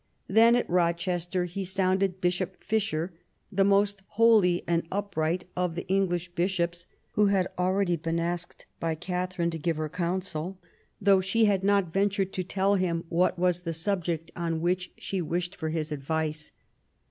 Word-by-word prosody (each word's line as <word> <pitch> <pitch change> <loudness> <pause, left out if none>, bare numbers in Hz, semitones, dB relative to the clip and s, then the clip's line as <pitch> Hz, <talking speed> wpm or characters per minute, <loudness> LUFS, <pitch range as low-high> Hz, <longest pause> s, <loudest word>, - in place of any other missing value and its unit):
Then 230 +3 +6
at 245 - +1
Eochester 175 +1 0
he 180 +3 -4
sounded 190 0 +1
Bishop 180 +1 -1
Fisher, 195 -5 -1 0.4
the 195 -1 +3
most 200 0 +3 0.2
holy 215 -6 +5
and 170 0 +1
upright 185 -4 -1
of 180 -2 -1
the 175 - -5
English 185 -2 0
bishops, 175 -1 -1 0.2
who 210 -1 +3
had 195 -2 +2
already 180 -1 +1
been 165 +1 -2
asked 170 0 -4
by 165 -1 -1
Katharine 180 0 -2
to 165 - -5
give 165 +1 -1
her 155 -1 -2
counsel, 180 0 -3 0.4
though 195 -2 +5
she 220 +4 +3
had 195 -2 +2
not 200 -4 +2
ventured 195 -1 +1
to 185 - -1
tell 195 +2 +1
him 170 -3 0
what 180 +2 +2
was 180 0 +2
the 170 -2 -4
subject 165 -2 -2
on 165 -2 -2
which 180 +2 -1
she 190 -2 -3
wished 175 +3 -2
for 160 - -3
his 155 -1 -2
advice. 155 +1 -2
180 Hz, 160 wpm, -28 LUFS, 170-195 Hz, 0.4 s, Then